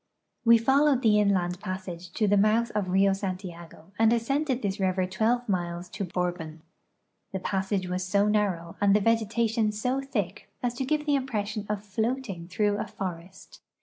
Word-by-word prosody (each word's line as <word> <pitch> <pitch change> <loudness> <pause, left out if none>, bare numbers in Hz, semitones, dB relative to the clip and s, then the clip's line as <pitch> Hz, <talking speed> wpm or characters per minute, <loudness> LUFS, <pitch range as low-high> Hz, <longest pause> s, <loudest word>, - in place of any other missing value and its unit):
" - - -53
We 230 0 +8
followed 270 +3 +3
the 210 -2 +5
inland 185 -3 +1
passage 185 -2 -6
to 215 - +1
the 205 - +4
mouth 215 +3 +3
of 205 -3 -1
Rio 195 +1 +4
Santiago 185 -3 -6
and 225 0 +5
ascended 260 +3 0
this 200 0 -1
river 185 -1 +1
12 225 +6 0
miles 175 -2 -2
to 195 +1 -4
Borhon. 175 -3 -3 0.7
The 190 - -3
pa.ssage 190 0 -1
was 180 +1 -2
so 200 +3 +2
narrow 195 -6 0
and 200 0 +5
the - - +5
vegetation 225 0 +1
so 250 +6 -1
thick 240 -9 -4
as 245 -1 0
to 260 +2 -3
give 300 +2 0
the 295 - +2
impression 215 -6 -2
of 210 -1 -2
floating 220 -4 -2
through 205 +2 +1
a - - -3
forest. 180 -1 -7
205 Hz, 175 wpm, -27 LUFS, 185-230 Hz, 0.7 s, We